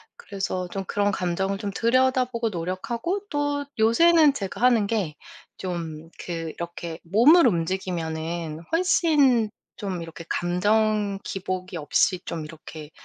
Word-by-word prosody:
그래서 190 Hz, -3 st, -4 dB
좀 195 Hz, +1 st, -4 dB
그런 205 Hz, +1 st, +1 dB
감정을 190 Hz, +2 st, -1 dB
좀 205 Hz, -, -4 dB
들여다보고 250 Hz, -1 st, +2 dB
노력하고 205 Hz, -, -3 dB
또 290 Hz, -1 st, -1 dB
요새는 305 Hz, +7 st, +5 dB
제가 200 Hz, -4 st, -5 dB
하는 235 Hz, -5 st, +4 dB
게 195 Hz, -9 st, -1 dB, 0.4 s
좀 165 Hz, -3 st, -5 dB, 0.2 s
그 175 Hz, -, -4 dB, 0.2 s
이렇게 170 Hz, -1 st, -6 dB
몸을 250 Hz, -, +6 dB
움직이면은 165 Hz, -3 st, -2 dB
훨씬 295 Hz, -, +3 dB, 0.3 s
좀 190 Hz, -5 st, -4 dB
이렇게 165 Hz, 0 st, -9 dB
감정 205 Hz, +3 st, +1 dB
기복이 185 Hz, -2 st, -4 dB
없이 175 Hz, +4 st, +1 dB
좀 160 Hz, -2 st, -4 dB
이렇게 155 Hz, -1 st, -10 dB
195 Hz, 260 characters per minute, -25 LUFS, 170-235 Hz, 0.4 s, 몸을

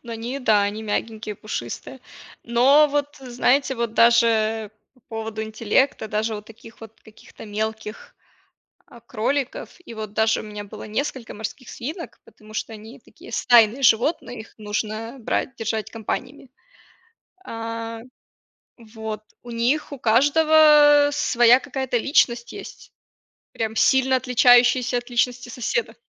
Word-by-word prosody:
Ну 235 Hz, -1 st, -8 dB
они 235 Hz, +4 st, -5 dB
да, 215 Hz, -6 st, +3 dB
они 205 Hz, +2 st, -3 dB
мягенькие, 215 Hz, 0 st, -4 dB
пушистые. 210 Hz, -, -7 dB, 0.4 s
Но, 265 Hz, +6 st, +4 dB
вот, 290 Hz, 0 st, -2 dB
знаете, 265 Hz, +2 st, +1 dB
вот 230 Hz, -1 st, -3 dB
даже 225 Hz, -2 st, +3 dB, 0.2 s
по 255 Hz, -, -27 dB
поводу 225 Hz, -1 st, -5 dB
интеллекта, 220 Hz, +2 st, 0 dB
даже 215 Hz, +1 st, -1 dB
у -, -, -7 dB
таких 225 Hz, +1 st, -16 dB
вот 225 Hz, 0 st, -13 dB
каких-то 220 Hz, 0 st, -15 dB
мелких, 220 Hz, +1 st, -5 dB, 0.7 s
а, 235 Hz, -, -16 dB
кроликов. 255 Hz, +4 st, -3 dB
И 230 Hz, -, -9 dB
вот 215 Hz, -2 st, -7 dB
даже 220 Hz, 0 st, +2 dB
у -, -, -7 dB
меня 210 Hz, -1 st, -8 dB
было 205 Hz, -, -10 dB
несколько 245 Hz, +2 st, -4 dB
морских 220 Hz, +4 st, -7 dB
свинок, 315 Hz, +8 st, -7 dB
потому 215 Hz, 0 st, -17 dB
что 225 Hz, -, -4 dB
они 220 Hz, +2 st, -12 dB
такие -, -, -16 dB
стайные 240 Hz, +1 st, +4 dB
животные, 245 Hz, +1 st, +2 dB
их -, -, -17 dB
нужно 215 Hz, +3 st, -4 dB
брать, 255 Hz, +3 st, -2 dB
держать 220 Hz, -1 st, -3 dB
компаниями. 245 Hz, +4 st, -6 dB, 1.0 s
А, 230 Hz, -1 st, -6 dB, 0.8 s
вот. 220 Hz, -2 st, -8 dB, 0.2 s
У 240 Hz, -, -11 dB
них 240 Hz, +7 st, 0 dB
у 280 Hz, -, -6 dB
каждого 295 Hz, +3 st, +5 dB
своя 240 Hz, -3 st, +4 dB
какая-то 265 Hz, -2 st, -3 dB
личность 240 Hz, -2 st, +1 dB
есть. -, -, -11 dB, 0.6 s
Прям 220 Hz, -1 st, -3 dB
сильно 265 Hz, -1 st, +3 dB
отличающаяся 245 Hz, 0 st, +4 dB
от 245 Hz, -, -9 dB
личности 245 Hz, +1 st, -1 dB
соседа. 250 Hz, -, -3 dB
230 Hz, 135 wpm, -22 LUFS, 220-260 Hz, 1.0 s, каждого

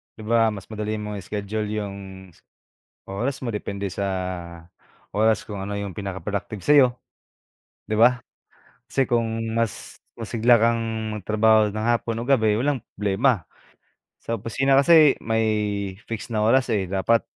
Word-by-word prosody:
'Di -, -, -11 dB
ba 115 Hz, 0 st, +2 dB
mas 100 Hz, -2 st, -10 dB
madali 110 Hz, 0 st, -3 dB
mong 105 Hz, 0 st, -5 dB
i-schedule 105 Hz, +3 st, -4 dB
'yong 105 Hz, -2 st, -4 dB, 0.4 s
s -, -, -24 dB, 0.7 s
oras 120 Hz, +8 st, -3 dB
mo 125 Hz, -, -3 dB
depende 100 Hz, -2 st, -4 dB
sa 100 Hz, +2 st, -3 dB, 1.0 s
oras 110 Hz, 0 st, +2 dB
kung 105 Hz, -, -8 dB
ano 100 Hz, +1 st, -4 dB
'yong 100 Hz, -3 st, -5 dB
pinaka-productive 100 Hz, +1 st, -4 dB
sa'yo, 135 Hz, +2 st, +5 dB, 0.9 s
'di 110 Hz, -, -2 dB
ba? 120 Hz, +3 st, +5 dB, 0.7 s
Kasi 135 Hz, -1 st, +1 dB
kung 115 Hz, -1 st, -1 dB
mas 115 Hz, -3 st, -2 dB, 0.2 s
masigla 115 Hz, +1 st, +3 dB
kang 115 Hz, +1 st, +2 dB, 0.3 s
magtrabaho 110 Hz, +1 st, +3 dB
nang 110 Hz, +2 st, -3 dB
hapon 115 Hz, -1 st, 0 dB
o 120 Hz, -, -5 dB
gabi, 110 Hz, -6 st, +3 dB
walang 135 Hz, -2 st, 0 dB
problema. 105 Hz, -, +1 dB, 0.8 s
Sa 115 Hz, -, -2 dB
opisina 115 Hz, +5 st, 0 dB
kasi 150 Hz, +1 st, +7 dB
may 110 Hz, 0 st, 0 dB, 0.6 s
fixed 115 Hz, +1 st, -5 dB
na 105 Hz, -, +1 dB
oras, 120 Hz, +2 st, +3 dB
eh, 95 Hz, -4 st, -1 dB
dapat 100 Hz, +4 st, +2 dB
110 Hz, 140 wpm, -23 LUFS, 105-115 Hz, 1.0 s, kasi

